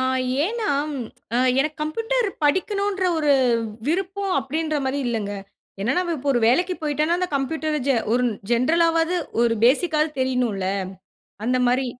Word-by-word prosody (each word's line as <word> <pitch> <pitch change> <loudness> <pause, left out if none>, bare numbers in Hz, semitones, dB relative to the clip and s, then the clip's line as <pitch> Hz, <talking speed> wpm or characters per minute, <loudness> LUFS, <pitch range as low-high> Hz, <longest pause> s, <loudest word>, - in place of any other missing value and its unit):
ஆ. - - +1 0.4
ஏனா 440 +2 -2 0.9
எனக்கு 305 +2 -1
"கம்ப்யூட்டர்" 455 +10 0 0.2
படிக்கணும்ன்ற 390 +5 +1
ஒரு 300 -2 +3 0.5
விருப்பம் 385 +3 -1
அப்டின்ற 310 +2 -2
மாரி 265 +2 -1
இல்லங்க. 215 -4 -2 0.5
என்ன 235 +7 0
நம்ப 355 -2 -1
இப்போ 280 0 -4
ஒரு 240 - +1
வேலைக்கு 360 +9 +2
போயிட்டோன்னா 305 +3 +1
அந்த 365 0 -1
கம்ப்யூட்டர 305 +2 -1
ஜெ 275 - +3 0.2
ஒரு 250 +1 +2 0.3
ஜென்ரலாவது 330 +7 +2 0.3
ஒரு 235 -1 +3
பேசிக்காது 305 +4 +3
தெரியனுல. 250 -7 0 0.8
அந்த 250 +2 +1
மாரி 255 +2 +1
305 Hz, 130 wpm, -23 LUFS, 260-360 Hz, 0.9 s, ஒரு